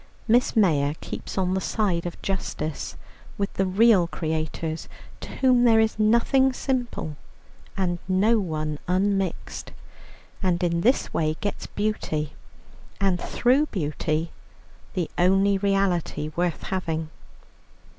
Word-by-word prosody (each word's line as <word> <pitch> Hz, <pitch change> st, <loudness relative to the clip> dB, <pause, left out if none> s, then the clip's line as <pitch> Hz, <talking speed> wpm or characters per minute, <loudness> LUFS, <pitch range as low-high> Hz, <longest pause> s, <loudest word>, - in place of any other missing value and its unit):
Miss 240 Hz, +3 st, +3 dB
Mayor 150 Hz, -9 st, +3 dB
keeps -, -, -7 dB
on 185 Hz, -1 st, +1 dB
the 190 Hz, -, 0 dB
side 185 Hz, -6 st, 0 dB
of 175 Hz, -, -7 dB
justice, 160 Hz, -5 st, -3 dB, 0.4 s
with 200 Hz, 0 st, -2 dB
the 195 Hz, -, 0 dB
real 195 Hz, -2 st, +5 dB
creators, 160 Hz, 0 st, -3 dB, 0.3 s
to -, -, -8 dB
whom 255 Hz, -2 st, +4 dB
there 225 Hz, -2 st, +6 dB
is 220 Hz, 0 st, +1 dB
nothing 235 Hz, +5 st, +4 dB
simple 245 Hz, -, -2 dB, 0.6 s
and 175 Hz, -2 st, 0 dB
no 205 Hz, +5 st, +3 dB
one 155 Hz, -5 st, -3 dB
unmixed, 190 Hz, 0 st, -1 dB, 0.7 s
and 180 Hz, -2 st, +1 dB
in 170 Hz, -1 st, +1 dB
this 250 Hz, +8 st, +2 dB
way 155 Hz, -1 st, 0 dB
gets 205 Hz, -, -3 dB
beauty, 155 Hz, -8 st, -2 dB, 0.7 s
and 190 Hz, -3 st, +1 dB
through 265 Hz, +5 st, +2 dB
beauty 155 Hz, -, -2 dB, 0.6 s
the 175 Hz, -4 st, 0 dB
only 195 Hz, +2 st, +4 dB
reality 190 Hz, -6 st, 0 dB
worth 175 Hz, -1 st, -1 dB
having. 160 Hz, -4 st, -3 dB
185 Hz, 120 wpm, -25 LUFS, 165-215 Hz, 0.7 s, there